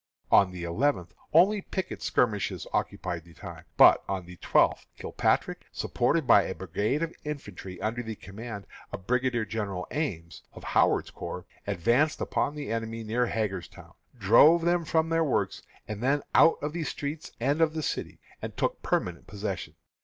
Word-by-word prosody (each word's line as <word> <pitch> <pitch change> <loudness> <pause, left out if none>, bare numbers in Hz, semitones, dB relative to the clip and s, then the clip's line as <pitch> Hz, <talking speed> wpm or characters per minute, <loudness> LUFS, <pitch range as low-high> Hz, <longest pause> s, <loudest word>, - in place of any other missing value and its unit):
On 100 - +6
the 90 -1 -7
eleventh 90 - 0 0.2
only 195 +6 +5
picket 190 -1 -5
skirmishes 105 -5 0
occupied 85 -2 -2
the 85 -1 -18
time. - - -10
But - - +7
on 95 -2 -2
the 90 0 -12
twelfth - - +2
Kilpatrick, - - -1
supported 140 +6 0
by 115 -4 +7
a 95 - -4
brigade 105 - -1
of 165 - -3
infantry 100 - -7
under 115 +3 -2
the 110 -2 -6
command 105 +1 -8 0.3
of 95 - -7
Brigadier 125 -1 +1
General 100 -4 -3
Ames, 85 - -3
of - - -11
Howard's - - +2
Corps, 90 - -6 0.2
advanced 120 - +2
upon 145 - -1
the 145 -5 -5
enemy 115 0 -3
near 120 +3 0
Hagerstown, 100 -6 -4 0.2
drove 140 - +6
them 170 0 +2
from 160 0 +1
their 165 0 +2
works, 145 - 0 0.3
and 105 0 -5
then 140 +3 +1
out 165 - +6
of 150 +1 -2
the 170 -1 -2
streets 150 +1 -5
of 155 +6 +2
the 155 - -2
city, - - -3 0.2
and - - -6
took - - -1
permanent 85 -2 -2
possession. 100 -2 -5
115 Hz, 160 wpm, -28 LUFS, 95-150 Hz, 0.3 s, But